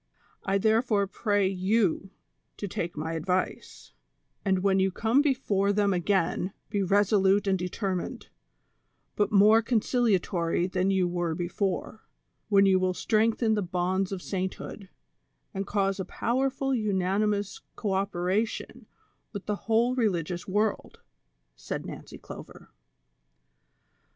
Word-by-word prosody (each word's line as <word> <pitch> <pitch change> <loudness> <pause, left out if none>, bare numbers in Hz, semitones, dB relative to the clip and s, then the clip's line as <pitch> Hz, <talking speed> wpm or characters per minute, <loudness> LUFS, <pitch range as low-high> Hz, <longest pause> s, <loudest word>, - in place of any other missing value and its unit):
I 195 - +1
tlierefore 215 -1 +2
pray 205 -3 +1
you 195 0 +1 0.5
to 205 - -4
take 170 -3 -4
my 160 +2 -3
advice; 180 +3 -3 0.5
and 190 -2 +1
when 195 -1 +3
you 190 0 +3
come 230 +8 +2
before 220 -9 +1
them 205 -1 +2
again 185 +1 0 0.2
be 205 -2 0
resolute 200 +1 +3
and 195 -1 +2
determined, 180 0 -3 0.9
but 205 +1 +1
more 215 +2 +6
concilia 230 -2 +2
tory 170 -1 -1
than 185 +1 0
you 190 -2 +2
were 175 -2 -2
before, 190 +4 -3 0.5
when 200 -1 +5
you 190 -1 +4
will 185 0 0
strengthen 220 +2 +2
the 210 - +1
bonds 185 +1 -1
of 190 -2 -5
sainthood, 190 +1 -5 0.6
and 195 0 -3
cause 195 -1 0
a 190 - -2
powerful 270 +6 -1
unanimous 205 -1 0
co 200 -3 -2
operation 195 +2 -2 0.5
with 200 -2 -6
the 210 - -1
whole 235 +3 +3
religious 180 -8 -1
world," 210 +2 -1 0.5
said - - -5
Xancy - - -9
Clover. - - -11
195 Hz, 125 wpm, -27 LUFS, 185-215 Hz, 0.9 s, more